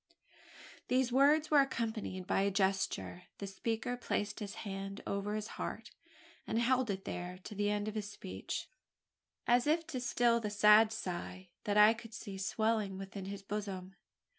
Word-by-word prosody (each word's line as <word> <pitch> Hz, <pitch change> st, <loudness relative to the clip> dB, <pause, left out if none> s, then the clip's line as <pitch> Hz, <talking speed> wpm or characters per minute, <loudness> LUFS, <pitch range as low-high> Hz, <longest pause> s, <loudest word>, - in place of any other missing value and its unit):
These 255 Hz, 0 st, +2 dB
words 295 Hz, +4 st, +4 dB
were 295 Hz, -, +7 dB
accompanied 220 Hz, -8 st, -1 dB
by 195 Hz, -, +2 dB
a 200 Hz, -, +3 dB
gesture. 190 Hz, -2 st, 0 dB
The 200 Hz, -, -5 dB
speaker 225 Hz, +5 st, -2 dB
placed 205 Hz, -4 st, -2 dB
his 205 Hz, -2 st, -5 dB
hand 195 Hz, 0 st, -5 dB
over 200 Hz, +1 st, -2 dB
his 215 Hz, -1 st, -2 dB, 0.2 s
heart, -, -, -5 dB, 0.6 s
and 220 Hz, -, 0 dB
held 250 Hz, +1 st, +2 dB
it 195 Hz, -1 st, -3 dB
there 180 Hz, +1 st, -5 dB
to -, -, -7 dB
the 205 Hz, 0 st, 0 dB
end 205 Hz, 0 st, -1 dB
of 215 Hz, -, -3 dB
his 210 Hz, -2 st, -3 dB
speech -, -, -5 dB, 0.8 s
as 245 Hz, +2 st, +4 dB
if 325 Hz, +2 st, +2 dB
to 260 Hz, -, -4 dB
still 240 Hz, -1 st, +3 dB
the 215 Hz, -2 st, -3 dB
sad 210 Hz, +1 st, +6 dB
sigh, 185 Hz, -3 st, -5 dB, 0.2 s
that 205 Hz, 0 st, +1 dB
I 210 Hz, +1 st, +8 dB
could 230 Hz, -1 st, -10 dB
see 200 Hz, -4 st, -7 dB
swelling 215 Hz, 0 st, 0 dB
within 195 Hz, 0 st, -6 dB
his 200 Hz, 0 st, -6 dB
bosom. 195 Hz, -2 st, -4 dB
210 Hz, 165 wpm, -34 LUFS, 195-235 Hz, 0.8 s, I